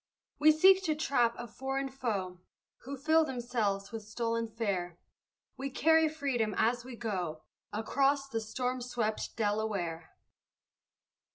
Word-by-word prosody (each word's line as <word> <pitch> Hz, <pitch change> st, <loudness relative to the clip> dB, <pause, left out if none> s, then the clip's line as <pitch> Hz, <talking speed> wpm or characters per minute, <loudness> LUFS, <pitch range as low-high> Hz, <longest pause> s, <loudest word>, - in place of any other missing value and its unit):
We 310 Hz, +1 st, +7 dB
seek 375 Hz, +5 st, +6 dB
to 310 Hz, -2 st, +1 dB
trap 245 Hz, -6 st, +2 dB
a 240 Hz, -, -5 dB
foreign 270 Hz, +4 st, -3 dB
foe, 200 Hz, -9 st, -3 dB, 0.5 s
Who 275 Hz, +2 st, -5 dB
fill 315 Hz, +4 st, +4 dB
themselves 235 Hz, -8 st, -2 dB
with 225 Hz, -1 st, -5 dB
stolen 230 Hz, +2 st, -2 dB
fare; 200 Hz, -6 st, -2 dB, 0.6 s
We 275 Hz, +1 st, -3 dB
carry 320 Hz, +3 st, +4 dB
freedom 265 Hz, -8 st, -1 dB
as 240 Hz, +2 st, +2 dB
we 250 Hz, -1 st, -8 dB
go 180 Hz, -9 st, -3 dB, 0.3 s
Across 275 Hz, +6 st, +1 dB
the 225 Hz, -4 st, -2 dB
storm 250 Hz, +3 st, -2 dB
swept 235 Hz, -3 st, -2 dB
Delaware! 205 Hz, -6 st, -2 dB
235 Hz, 125 wpm, -31 LUFS, 215-275 Hz, 0.6 s, We